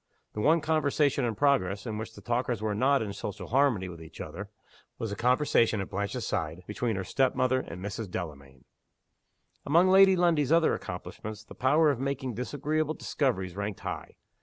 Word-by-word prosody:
The 105 - -3
one 160 +7 +4
conversation 145 -3 +1
in 115 -2 -1
progress, 105 -8 +1
in 110 -2 -4
which 110 +1 -7
the - - -11
talkers 120 -1 -1
were 105 0 -1
not 135 +4 +2
in 100 -2 -5
social 100 -1 -6
harmony 125 -7 +2
with 85 -2 -9
each 80 - -12
other, - - -7 0.5
was 115 -2 -4
the - - -3
conversation 120 -2 +2
at 95 - -5
Blanche's 100 0 -3
side, 80 +3 -3
between 110 +2 -2
her 95 - -2
step 130 +7 +1
mother 130 0 +2
and 90 -5 -7
Mrs. 105 0 -5
Delamayn. 70 -7 -7 1.0
Among 170 +6 +4
Lady 190 0 +7
Lundie's 165 -6 +2
other 165 -1 +4
accomplishments 110 0 -6
the 105 - -12
power 150 +4 +3
of 130 - -3
making 135 -2 -2
disagreeable 150 +6 -2
discoveries 95 - -1
ranked 100 0 -4
high. - - -6
120 Hz, 180 wpm, -29 LUFS, 100-145 Hz, 1.0 s, Lady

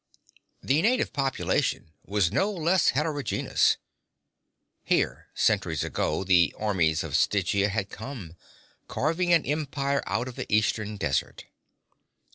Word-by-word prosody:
The 140 +4 +2
native 240 +5 +1
population 135 - -1
was 100 -4 0
no 200 +2 +1
less 175 -1 +1
heterogenous. 145 -3 +1 1.1
Here, - - 0
centuries 80 -3 +1
ago, - - -1
the 90 -3 +3
armies 90 -7 +1
of - - -4
Stygia 100 0 +2
had 100 -1 -3
come, 110 - -8 0.5
carving 165 +5 0
an 170 -2 +4
empire 140 -2 -1
out 115 +5 -1
of 125 - -9
the - - -6
eastern 105 0 +1
desert. 75 -9 -2
110 Hz, 115 wpm, -26 LUFS, 100-150 Hz, 1.1 s, an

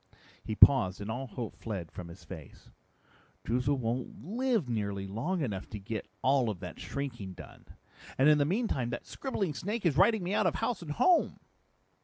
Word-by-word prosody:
He 110 - -3
paused 105 -8 +6
and 105 +2 -4
all 130 +4 -4
hope 115 -1 -6
fled 95 -8 -5
from 90 - -7
his 85 +3 -12
face. 80 -7 -11 0.7
"Droozle 125 +4 +1
won't 125 +2 -3
live 230 - 0
nearly 100 -4 -2
long 125 - -2
enough 100 -7 -3
to 105 - -5
get 105 +1 -5 0.2
all 130 -3 +3
of 100 -5 -4
that 90 -3 -8
shrinking 120 -9 -5
done. - - -13 0.5
And 135 - +5
in 150 -1 +6
the - - +5
meantime 170 - 0
that 120 -1 -5
scribbling 200 - -2
snake 205 +7 -3
is 155 -4 +3
writing 220 -1 +5
me 180 +3 -1
out - - +3
of - - 0
house 235 -7 -1
and 155 -3 -4
home!" 360 - +3
125 Hz, 185 wpm, -31 LUFS, 105-170 Hz, 0.7 s, paused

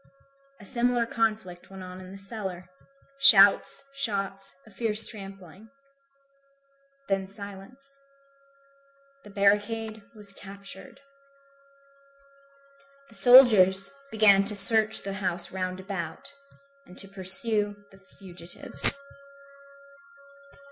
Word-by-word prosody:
A 205 - -15
similar 240 0 -2
conflict 215 -6 -4
went 190 -1 -12
on 185 0 -11
in 185 0 -13
the 195 - -12
cellar. 195 -3 -9 0.5
Shouts, 205 -8 +4
shots, 195 - +1
a 215 - -19
fierce 215 +1 -3
trampling. 195 -1 -13 1.4
Then 195 -1 -3
silence. 205 +8 -14 1.2
The 205 - -15
barricade 210 +2 -2
was 205 -2 -8
captured. 195 +2 -14 2.1
The - - -19
soldiers 215 -7 +5 0.2
began 210 -4 +3
to 210 - +12
search 215 +2 0
the 195 - -6
houses 180 -3 -2
round 185 -1 -5
about, 185 -4 -8 0.5
and 180 - -17
to 195 - +2
pursue 205 +2 -2 0.2
the 195 - -20
fugitives. 185 +6 0
200 Hz, 95 wpm, -25 LUFS, 190-220 Hz, 2.1 s, to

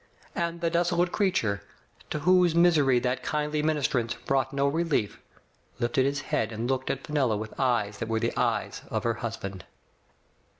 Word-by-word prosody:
And 170 0 -2
the 170 -1 +1
desolate 175 +1 +1
creature, 175 - +1 0.5
to 150 - -3
whose 180 -1 +4
misery 155 -7 +5
that 125 0 -1
kindly 150 +2 -1
ministrance 140 -6 0
brought 135 -1 +1
no 140 0 +1
relief, 150 -8 0 0.6
lifted 125 +3 +1
his 145 +1 -1
head 115 -4 -1
and 115 +2 -3
looked 130 0 -1
at 135 - -3
Fenella 135 -8 +1
with 110 +1 -6
eyes 115 -6 +1
that 115 - -4
were 110 0 +1
the - - -1
eyes - - -1
of - - -2
her 115 - +1
husband. 100 -5 -5
135 Hz, 165 wpm, -27 LUFS, 115-165 Hz, 0.6 s, misery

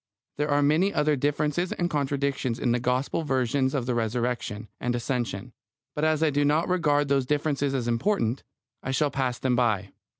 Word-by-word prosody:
There 150 +1 0
are 145 0 +3
many 160 +7 +3
other 150 -5 +2
differences 150 +5 0
and 175 - -1
contradictions 140 -5 -1
in 120 - 0
the 120 - +2
Gospel 125 +6 0
versions 130 -1 0
of 130 -4 -1
the 125 - 0
Resurrection 115 -1 -2
and 120 0 -1
Ascension; 120 -5 -3 0.4
but 150 - -3
as 155 0 +2
I 155 - +3
do 145 +1 +1
not 150 +3 +2
regard 150 -5 +2
those 135 -2 +1
differences 145 -1 0
as 125 -3 -1
important, 120 - 0 0.4
I - - -5
shall 145 +2 +1
pass 130 -3 -1
them 130 -2 0
by. 105 -6 +1
135 Hz, 180 wpm, -26 LUFS, 125-150 Hz, 0.4 s, are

